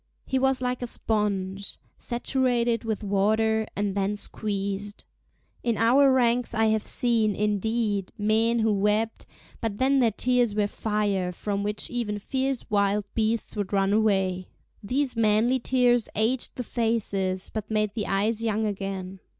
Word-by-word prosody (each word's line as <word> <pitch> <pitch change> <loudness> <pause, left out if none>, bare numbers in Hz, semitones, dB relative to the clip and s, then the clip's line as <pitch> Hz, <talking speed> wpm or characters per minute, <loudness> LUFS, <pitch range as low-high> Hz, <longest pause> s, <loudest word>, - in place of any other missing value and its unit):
He 265 - 0
was 265 -1 +1
like 250 0 -1
a 245 - -2
sponge 200 -4 -2 0.2
saturated 240 -1 0
with 220 -1 -3
water, 220 +2 +1
and 205 -1 -1
then 200 +1 0
squeezed. 200 -1 -4 0.6
In 235 -2 0
our 265 +4 +5
ranks 245 -2 +2
I 225 0 +3
have 220 - +1
seen, 225 -3 +1
indeed, 210 -1 -1
men 220 +3 +2
who 220 -2 +2
wept, 210 +3 0 0.3
but 225 -4 -2
then 270 +3 +3
their 240 -3 +4
tears 245 0 +1
were 210 -1 +2
fire, 205 -3 -1
from 200 +3 -3
which 210 +1 -2
even 230 -4 -2
fierce 265 +4 -2
wild 205 -1 +1
beasts 225 0 -1
would 205 -1 -3
run 195 0 +2
away. 190 -4 +1 0.3
These 255 +5 0
manly 225 +3 +3
tears 245 -2 +2
aged 230 +4 +1
the 250 - -3
faces, 200 -6 -1
but 215 -2 -4
made 215 -1 0
the 210 -1 -3
eyes 215 +3 0
young 220 -1 0
again. 195 -2 -4
215 Hz, 150 wpm, -26 LUFS, 200-235 Hz, 0.6 s, our